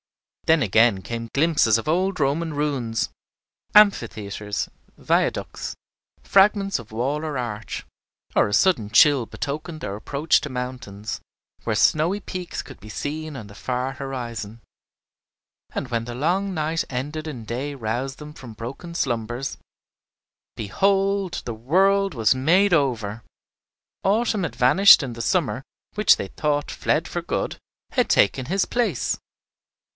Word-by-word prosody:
Then 160 -3 +5
again 110 -1 +4
came 115 +2 -5
glimpses 145 -7 +3
of 115 - -6
old 185 +3 +1
Roman 150 +3 0
ruins, 120 - -1 0.7
amphitheatres, 105 - +2 0.3
viaducts, - - -1 0.5
fragments 195 0 +4
of 110 -3 -12
wall 135 +7 -1
or 150 -3 -3
arch; 115 -3 -5 0.5
or - - +4
a - - -4
sudden 115 - +3
chill 135 +3 +5
betokened 145 +8 -5
their 100 - -4
approach 140 +8 +1
to 150 - -5
mountains, 125 -5 -5 0.4
where - - -1
snowy 165 +6 +3
peaks 185 -3 -5
could - - -12
be 105 - -11
seen 150 +5 -4
on 115 - -8
the 100 - -13
far 125 +4 -2
horizon. 120 -5 -6 1.1
And 130 - -3
when 115 -2 -1
the 120 0 -6
long 185 +8 0
night 160 0 -1
ended 150 +5 -4
and 120 -8 -7
day 130 +6 -3
roused 125 +3 -3
them 150 0 -10
from 130 -6 -11
broken 130 +10 -7
slumbers, 120 -1 -2 1.0
behold, 195 - +1
the 120 - -3
world 190 - +2
was 115 -2 +3
made 175 +9 +3
over! 115 -8 0 0.8
Autumn 210 0 +2
had 145 -8 -3
vanished, 130 +13 +7
and 125 -3 -4
the 115 - -5
summer, 140 -4 0 0.3
which 210 0 +5
they 100 - -4
thought 145 +3 -1
fled - - 0
for - - -3
good, - - -2 0.4
had - - +1
taken 125 +5 +3
his 190 +3 +1
place. 225 - 0
135 Hz, 140 wpm, -23 LUFS, 115-165 Hz, 1.1 s, vanished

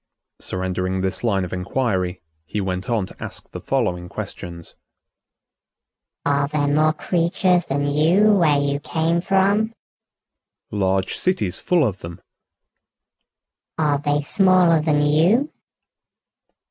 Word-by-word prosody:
Surrendering 95 0 -3
this 95 +3 -2
line 100 -5 +1
of 90 - -8
inquiry, 90 -2 -2 0.2
he 105 - -3
went 95 0 -3
on 115 -5 0
to - - -13
ask - - -8
the - - -7
following 90 0 -1
questions: 85 -1 -8 1.5
"Are 140 0 +1
there 145 -1 -1
more 155 +2 +3
creatures 175 +2 +1
than 140 +1 -1
you 165 +9 +3
where 160 -7 +3
you 140 0 -1
came 165 +3 0
from?" 200 +4 +1 1.0
"Large 95 -2 0
cities 105 - 0
full 175 -5 +2
of 100 -5 -2
them." 85 0 -9 1.6
"Are 150 -3 +1
they 145 0 0
smaller 180 -1 +4
than 150 -1 +1
you?" 170 - +3
145 Hz, 120 wpm, -21 LUFS, -, 1.6 s, smaller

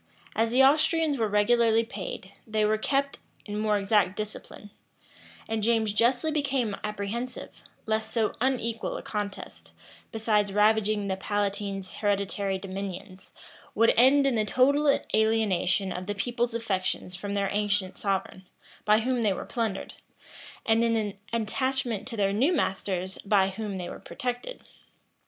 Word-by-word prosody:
As 225 +1 +2
the 255 +3 +4
Austrians 305 +1 +3
were 220 - +2
regularly 225 +2 +3
paid, 195 -3 -7 0.2
they 215 -1 +1
were 215 +1 +1
kept 275 +4 0 0.3
in 210 0 -4
more 215 -1 +2
exact 200 -1 +2
discipline; 210 0 -7 0.8
and 225 -1 -1
James 220 -1 +2
justly 245 +7 +2
became 270 -8 0
apprehensive, 210 +4 -5 0.2
lest 220 0 -1
so 220 -1 0
unequal 235 -3 -1
a - - -8
contest, 205 -2 -6 0.4
besides 215 -2 +1
ravaging 210 0 +3
the 190 -1 -1
palatine's 200 -1 -2
hereditary 200 -1 0
dominions, 190 0 -7 0.4
would 230 +2 +5
end 270 +4 +5
in 270 - +2
the 220 -2 +2
total 280 +6 +3
alienation 210 -4 +2
of 180 +1 -6
the 205 - -2
people's 240 +2 -1
affections 190 -4 -2
from 200 +2 -4
their 200 -1 0
ancient 205 -2 0
sovereign, 190 -2 -3 0.4
by 215 +1 +4
whom 250 +1 0
they 210 -3 +2
were - - -6
plundered, 225 -5 -3 0.7
and 225 +1 +3
in 230 -1 +2
an 210 -3 -1 0.2
attachment 235 0 -1
to 235 -3 -6
their 195 -1 +2
new 260 - +3
masters, 190 - -1
by 195 -2 +2
whom 205 0 -5
they 180 -2 -4
were - - -8
protected. 250 - -5
215 Hz, 145 wpm, -27 LUFS, 200-235 Hz, 0.8 s, would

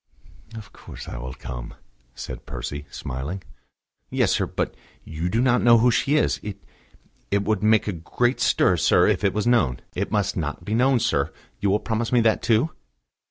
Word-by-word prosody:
"Of 110 -3 -10
course - - -11
I - - -6
will 65 +1 -6
come," - - -7 0.4
said 65 -1 -8
Percy, 70 +4 -6
smiling. 75 +9 -5 0.7
"Yes, - - +1
sir; - - +1
but - - -2 0.3
you 80 +3 -3
do 110 - 0
not 125 -1 +3
know 120 -1 +6
who 120 +2 +4
she 135 +6 +1
is. 150 - +2
It 105 -2 -6 0.7
it 100 0 +1
would 105 -1 0
make 110 0 +3
a 105 - -1
great 120 +9 -1
stir, - - +3
sir, - - +4
if - - +1
it 100 -1 +1
was 105 - 0
known. 115 - +2
It - - -2
must 105 -2 0
not 80 0 -4
be 105 - -2
known, 125 +2 +3
sir; 80 -10 0 0.3
you 100 - +1
will 100 +2 +2
promise 115 +1 -2
me 125 - +4
that, 110 -1 +2
too?" 120 +8 +2
105 Hz, 190 wpm, -24 LUFS, 80-115 Hz, 0.7 s, know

